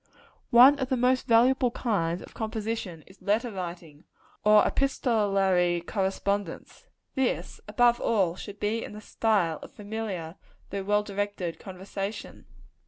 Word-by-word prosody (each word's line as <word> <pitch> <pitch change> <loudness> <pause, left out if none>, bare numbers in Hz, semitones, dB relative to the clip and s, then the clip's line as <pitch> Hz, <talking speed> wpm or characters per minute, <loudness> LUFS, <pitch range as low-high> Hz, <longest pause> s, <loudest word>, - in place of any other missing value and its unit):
One 265 +4 +7
of 260 -1 -2
the 260 - +1
most 255 +1 +2
valuable 250 +2 +4
kinds 185 -8 -1
of - - -13
composition 220 -6 -4
is 190 +2 -19
letter 215 +5 0
writing, 170 -5 -7 0.4
or 210 0 +6
epistolary 195 -9 +1
correspondence. 195 0 -3 0.3
This, 265 -2 -2
above 240 -1 +3
all, 190 -7 +1
should 205 +2 -9
be 220 +3 -1
in - - -8
the 210 - -8
style 200 -9 0
of - - -11
familiar 205 -6 -5 0.3
though 200 0 -3
well 210 +1 +2
directed 200 -4 -4
conversation. 195 +2 -7
205 Hz, 130 wpm, -27 LUFS, 185-230 Hz, 0.4 s, One